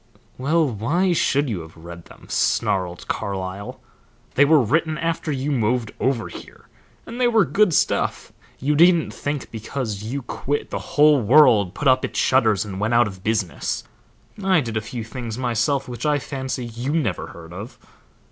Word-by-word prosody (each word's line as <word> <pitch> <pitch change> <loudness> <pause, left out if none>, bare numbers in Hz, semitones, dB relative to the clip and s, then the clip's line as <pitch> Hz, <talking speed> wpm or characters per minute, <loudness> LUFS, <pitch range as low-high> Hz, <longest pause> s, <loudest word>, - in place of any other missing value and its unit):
"Well, 155 +4 +2
why 150 - 0
should 145 -3 +1
you 105 -8 -3
have 80 +1 -13
read 85 +1 -10
them?" - - -16
snarled 90 -2 0
Carlyle. 95 0 -4 0.5
"They 145 - +5
were 155 +1 +5
written 155 +6 +1
after 165 -1 -2
you 140 +1 -2
moved 120 -2 0
over 130 -4 0
here, - - -12 0.4
and 240 +2 -6
they 245 - +5
were 225 -4 +4
good 180 +8 +3
stuff. 150 - 0 0.2
You 145 +3 0
needn't 170 +2 +4
think 145 -1 -4
because 110 -2 -4
you 125 +6 -4
quit, 145 +4 -3
the - - -2
whole 150 -2 +4
world 115 -6 +5
put 150 - -1
up 130 0 +4
its - - -4
shutters 110 -6 +3
and 95 -2 -6
went 110 +3 +1
out 120 0 +5
of 95 -3 -8
business. 110 -5 -1 0.6
I 190 -3 +4
did 115 -6 -4
a 110 - 0
few 115 +1 -6
things 115 -1 -6
myself 125 +2 0
which 120 -1 -7
I 150 -1 +2
fancy 130 -1 -4
you 120 +5 -4
never 125 - -1
heard 85 0 -12
of." 100 +7 -8
125 Hz, 175 wpm, -22 LUFS, 105-150 Hz, 0.6 s, They